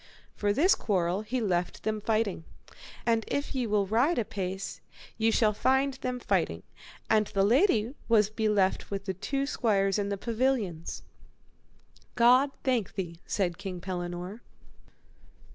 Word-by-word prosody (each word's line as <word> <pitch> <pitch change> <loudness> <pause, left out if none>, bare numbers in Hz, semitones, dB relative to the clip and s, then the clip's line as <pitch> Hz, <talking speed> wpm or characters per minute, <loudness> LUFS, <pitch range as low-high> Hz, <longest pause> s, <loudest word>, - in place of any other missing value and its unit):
For 205 -1 +1
this 315 - +4
quarrel 185 -2 0
he 240 +4 -2
left 180 -5 -1
them 215 -1 -1
fighting. 215 -5 0 0.6
And 230 -1 +2
if 285 - -2
ye 255 -3 -1
will 205 -1 +2
ride 245 - +2
a 230 - +1
pace 190 -2 -5 0.3
ye 225 0 +2
shall 215 -1 +3
find 265 +5 +2
them 255 -1 -4
fighting, - - 0 0.4
and 215 -1 +3
the 195 - +1
lady 235 - +3 0.2
was 215 -2 +4
beleft 210 -3 +1
with 200 -1 -4
the 190 - -2
two 275 +9 -2
squires 200 -7 +1
in 200 0 -1
the 200 - -2
pavilions. 225 -7 -1 1.1
God 250 +4 +5
thank 245 -7 0
thee, 170 -3 -5
said 180 -4 -1
King 190 -3 -5
Pellinore. 180 +3 -5
210 Hz, 145 wpm, -29 LUFS, 195-240 Hz, 1.1 s, God